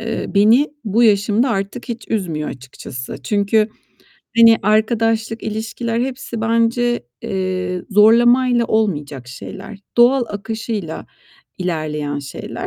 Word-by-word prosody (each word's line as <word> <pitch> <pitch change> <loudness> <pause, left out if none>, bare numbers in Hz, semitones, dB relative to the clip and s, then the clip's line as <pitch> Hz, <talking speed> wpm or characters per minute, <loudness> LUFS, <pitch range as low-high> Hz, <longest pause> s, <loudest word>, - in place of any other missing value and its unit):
eee, 225 0 -3
beni 225 +8 +5 0.2
bu 220 +3 +2
yaşımda 215 +3 +3
artık 200 +3 -3
hiç 235 -1 -5
üzmüyor 165 -8 -2
açıkçası. 130 0 -8
Çünkü, 210 +4 +2 0.7
hani, 230 -1 +8
arkadaşlık, 220 +1 +1
ilişkiler 225 +2 -3
hepsi 250 -3 -4
bence, 230 - +1 0.2
eee, 185 -1 -2
zorlamayla 240 +4 +5
olmayacak 145 - -1
şeyler, 195 - -9 0.2
doğal 245 +1 +5
akışıyla 210 -4 -5 0.5
ilerleyen 150 -5 -2
şeyler. 140 -1 -7
215 Hz, 105 wpm, -19 LUFS, 185-230 Hz, 0.7 s, hani